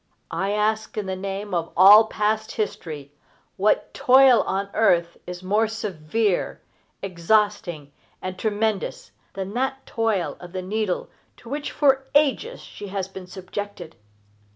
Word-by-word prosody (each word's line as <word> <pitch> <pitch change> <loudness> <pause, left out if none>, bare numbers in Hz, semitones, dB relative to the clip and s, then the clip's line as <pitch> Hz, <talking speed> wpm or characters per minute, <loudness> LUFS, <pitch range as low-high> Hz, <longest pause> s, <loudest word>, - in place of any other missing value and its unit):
I 195 - -1
ask, 215 +1 -1
in 210 - -1
the 190 0 -3
name 195 +1 -5
of 170 -1 -1
all 205 +4 +9
past 215 0 -1
history, 165 -10 -4 0.4
what 205 +2 +1
toil 260 -1 +6
on 195 +1 -2
earth 170 -6 +2
is 180 0 -7
more 210 +4 +2
severe, 210 -1 -1 0.4
exhausting, 180 -4 0 0.3
and 185 0 -5
tremendous 215 0 -2 0.2
than 195 +1 -4
that 265 +2 -2
toil 220 -6 -1
of 175 0 -11
the 185 -1 -4
needle 205 0 -2 0.3
to 230 - -13
which 290 +2 -3
for 270 -2 +2
ages 305 - +2
she 205 - -10
has 190 -1 -3
been 190 -1 -10
subjected? 185 -2 -7
205 Hz, 135 wpm, -24 LUFS, 185-220 Hz, 0.4 s, all